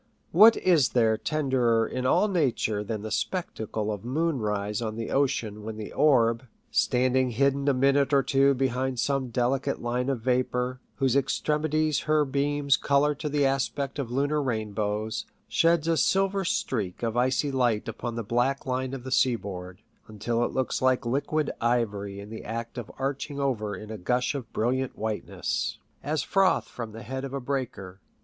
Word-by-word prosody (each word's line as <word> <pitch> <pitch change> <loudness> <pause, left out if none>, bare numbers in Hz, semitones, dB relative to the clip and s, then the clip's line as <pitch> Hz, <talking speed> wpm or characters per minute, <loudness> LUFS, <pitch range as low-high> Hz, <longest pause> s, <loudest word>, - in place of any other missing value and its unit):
What 215 +7 +8
is 165 -8 +3
there 110 -2 +4
tenderer 125 -5 +1
in 130 0 -2
all 210 - +4
nature 130 - 0
than 105 0 -4
the 110 - -5
spectacle 110 - -2
of 105 -1 -5
moon 150 +4 0
rise 105 0 -2
on 110 -2 -3
the 115 0 -4
ocean 120 -6 0
when 110 +1 -6
the 110 - -7
orb, 125 -4 +3 0.2
standing 130 +1 +2
hidden 140 +3 +1
a 140 - +4
minute 140 +2 +3
or 140 -1 +4
two 135 +1 +3
behind 130 0 -1
some 135 -1 0
delicate 130 +4 0
line 125 +2 -1
of 130 -4 -1
vapour, 125 +1 0 0.2
whose 135 -1 +1
extremities 150 +2 +1
her 155 -1 +4
beams 140 0 +1
colour 145 +1 +2
to 150 +1 -4
the 145 -1 +2
aspect 135 +1 -1
of 130 -4 -3
lunar 145 +4 0
rainbows, 110 -3 -2 0.2
sheds 165 -1 +2
a 165 -1 +2
silver 195 +2 +2
streak 110 - -2
of 115 -1 -1
icy 130 +4 +1
light 120 -5 +1
upon 115 +1 -4
the 115 - -3
black 120 +5 0
line 130 0 -2
of 130 - -8
the 130 - -7
seaboard, 100 -7 -1 0.3
until 115 +2 -1
it - - -1
looks 130 -1 -1
like 130 -1 +2
liquid 145 +4 0
ivory 105 -4 0
in 100 +2 -9
the 110 - -7
act 115 +2 -5
of 115 - -8
arching 140 +1 -3
over 110 -7 -1
in 105 0 -9
a 110 - -6
gush 125 +8 0
of 135 -6 -6
brilliant 130 +3 -1
whiteness, 110 -1 -2 0.2
as 155 +1 -1
froth 195 -1 +2
from 115 -3 -7
the 115 +2 -9
head 130 +2 -5
of 135 0 -5
a - - -2
breaker 120 -8 -4
130 Hz, 175 wpm, -27 LUFS, 115-140 Hz, 0.3 s, What